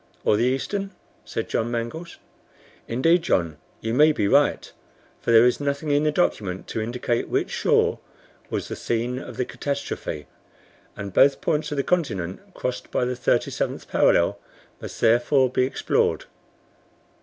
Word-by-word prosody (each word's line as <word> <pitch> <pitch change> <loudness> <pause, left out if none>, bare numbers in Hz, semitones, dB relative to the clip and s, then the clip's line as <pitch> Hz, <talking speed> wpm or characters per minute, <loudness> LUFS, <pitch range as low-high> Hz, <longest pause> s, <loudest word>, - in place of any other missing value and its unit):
"Or - - +4
the 115 - +2
eastern?" 195 +10 -1 0.4
said - - -4
John 115 - -1
Mangles. 120 +9 -5 0.7
"Indeed, 165 +9 +3
John, 85 - 0 0.2
you 115 0 -2
may 150 +5 +6
be 105 -9 0
right, - - +2 0.5
for - - -4
there 115 +1 +7
is 125 - +2
nothing 145 +1 -2
in 145 0 +3
the 150 - +3
document 100 - -1
to 110 - -2
indicate 120 +1 -2
which - - -1
shore - - +2 0.5
was - - -3
the - - -5
scene 120 +2 -2
of - - -9
the 125 - 0
catastrophe, 140 - -4 0.7
and 100 -2 -6
both 140 +7 +5
points 150 -1 -1
of 145 - -3
the 140 - +1
continent 100 - -1 0.2
crossed 125 0 -4
by 125 - 0
the 125 - -1
37th 125 - -1
parallel, - - +3 0.4
must, - - -8
therefore, 120 +3 +3
be 130 - +2
explored." 130 - 0
125 Hz, 155 wpm, -24 LUFS, 115-145 Hz, 0.7 s, there